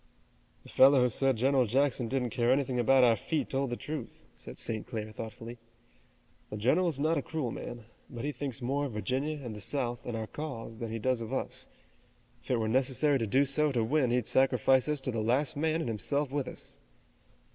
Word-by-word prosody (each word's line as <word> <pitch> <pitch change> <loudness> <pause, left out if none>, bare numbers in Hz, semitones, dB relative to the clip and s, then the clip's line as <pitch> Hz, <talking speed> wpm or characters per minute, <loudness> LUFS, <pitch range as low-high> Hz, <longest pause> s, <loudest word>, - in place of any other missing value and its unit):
"The - - -14
fellow 135 0 +6
who 125 - +3
said 135 +2 +1
General 130 +1 +3
Jackson 130 +1 +1
didn't 125 -1 -1
care 120 +2 +2
anything 130 -2 +1
about 130 +2 +5
our 120 -2 +6
feet 150 +8 -2
told 135 0 0
the 120 - -2
truth," 155 +5 -7
said - - -10
St. 110 -2 -2
Clair, 110 -3 -5
thoughtfully. 115 +2 -8 0.9
"The 105 - -5
general 140 - +2
is 155 -5 -1
not 155 +1 +2
a - - -3
cruel 145 -5 -3
man, 120 -1 -7 0.2
but 120 0 -6
he 150 - -1
thinks 135 -4 -4
more 140 +4 0
of 130 - -5
Virginia 130 +8 -2
and 115 -4 -6
the 105 - -7
South, 120 +1 -2
and 120 -2 -3
our 110 - -3
cause, 115 -5 -7
than 115 - -4
he 115 - -3
does 125 +1 0
of 115 +1 -6
us. 135 - -3 0.7
If - - -18
it 125 - +2
were 110 -1 -1
necessary 135 +4 +2
to 115 - -1
do 135 +7 +3
so 150 +2 +1
to 120 -4 +1
win 130 +2 +2
he'd 125 -1 +1
sacrifice 130 +1 +3
us 150 -2 0
to 130 - -2
the 115 -2 -2
last 130 +8 +1
man 160 +2 0
and - - -3
himself 135 +5 -1
with 140 -2 -1
us." - - -7
130 Hz, 215 wpm, -30 LUFS, 115-140 Hz, 0.9 s, fellow